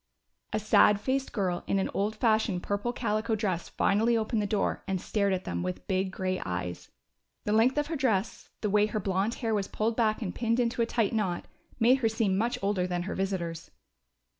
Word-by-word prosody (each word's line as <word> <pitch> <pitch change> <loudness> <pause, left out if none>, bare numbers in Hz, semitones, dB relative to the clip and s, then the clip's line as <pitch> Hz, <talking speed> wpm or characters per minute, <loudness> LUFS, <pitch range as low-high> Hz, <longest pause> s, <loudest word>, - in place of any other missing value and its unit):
A 215 - 0
sad 210 -1 +5
faced 265 +4 -1
girl 185 -4 -1
in 195 - +1
an 190 - 0
old 210 +2 0
fashioned 215 -5 +1
purple 205 +4 -1
calico 220 -2 -1
dress 190 -5 -2
finally 225 +4 +2
opened 220 0 0
the 205 - -1
door 205 -1 -1
and 190 -1 -1
stared 200 +1 0
at 185 -1 -1
them 85 0 -3
with 90 0 -4
big 190 0 0
gray 185 0 -2
eyes. 90 -1 -4 0.5
The 210 - -1
length 235 +6 +4
of 295 - +2
her 320 - -3
dress, 225 -7 -1
the 210 - 0
way 210 0 +4
her 215 0 -2
blond 195 +3 0
hair 225 - +1
was 200 -2 0
pulled 220 +1 -1
back 225 -1 +1
and 185 - -3
pinned 230 0 0
into 235 0 +1
a 230 - +2
tight 230 -3 0
knot, 195 -6 -1 0.3
made 250 +3 +5
her 225 -4 +2
seem 220 -4 +1
much 230 +5 0
older 195 -2 +1
than 175 -1 -2
her 195 - -4
visitors. 175 -4 -3
210 Hz, 210 wpm, -29 LUFS, 190-225 Hz, 0.5 s, sad